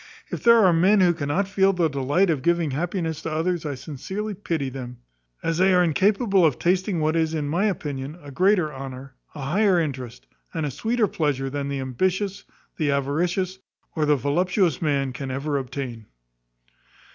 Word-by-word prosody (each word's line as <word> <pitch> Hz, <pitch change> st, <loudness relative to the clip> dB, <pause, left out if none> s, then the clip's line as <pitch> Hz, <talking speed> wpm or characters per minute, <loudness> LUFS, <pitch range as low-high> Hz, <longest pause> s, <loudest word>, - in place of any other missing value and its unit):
If -, -, -4 dB
there 235 Hz, -3 st, +7 dB
are 180 Hz, -, +5 dB
men 190 Hz, +5 st, +4 dB
who 175 Hz, -2 st, +5 dB
cannot 160 Hz, +5 st, -1 dB
feel 195 Hz, 0 st, +3 dB
the 175 Hz, -3 st, +2 dB
delight 145 Hz, +6 st, +1 dB
of 150 Hz, -5 st, -1 dB
giving 170 Hz, -2 st, +1 dB
happiness 165 Hz, +2 st, -2 dB
to 165 Hz, -, -4 dB
others, 165 Hz, +1 st, -1 dB
I 145 Hz, -, -3 dB
sincerely 175 Hz, +11 st, -5 dB
pity 165 Hz, -7 st, -3 dB
them, 125 Hz, -2 st, -7 dB, 0.5 s
as 165 Hz, 0 st, -1 dB
they 190 Hz, 0 st, +5 dB
are 180 Hz, -, +5 dB
incapable 195 Hz, -, +2 dB
of 150 Hz, -7 st, +3 dB
tasting 185 Hz, +1 st, +1 dB
what 155 Hz, +1 st, +1 dB
is, 160 Hz, -1 st, +1 dB
in 150 Hz, -2 st, -2 dB
my 175 Hz, +8 st, +1 dB
opinion, 145 Hz, -6 st, -3 dB
a 145 Hz, -3 st, -11 dB
greater 180 Hz, -1 st, +2 dB
honour, 135 Hz, 0 st, -8 dB, 0.2 s
a 145 Hz, -, -6 dB
higher 185 Hz, +6 st, +2 dB
interest, 130 Hz, -6 st, -4 dB, 0.3 s
and 160 Hz, -2 st, -1 dB
a 145 Hz, -, -2 dB
sweeter 225 Hz, -, 0 dB
pleasure 140 Hz, -6 st, -1 dB
than 140 Hz, 0 st, -3 dB
the 140 Hz, -1 st, -2 dB
ambitious, 185 Hz, -, -1 dB, 0.3 s
the 155 Hz, -3 st, 0 dB
avaricious, 175 Hz, +7 st, 0 dB, 0.4 s
or 155 Hz, -2 st, +1 dB
the 150 Hz, -, +5 dB
voluptuous 170 Hz, -, +1 dB
man 140 Hz, -4 st, 0 dB
can 135 Hz, 0 st, -5 dB
ever 140 Hz, +2 st, -1 dB
obtain." 125 Hz, -4 st, -6 dB
160 Hz, 180 wpm, -24 LUFS, 140-185 Hz, 0.5 s, there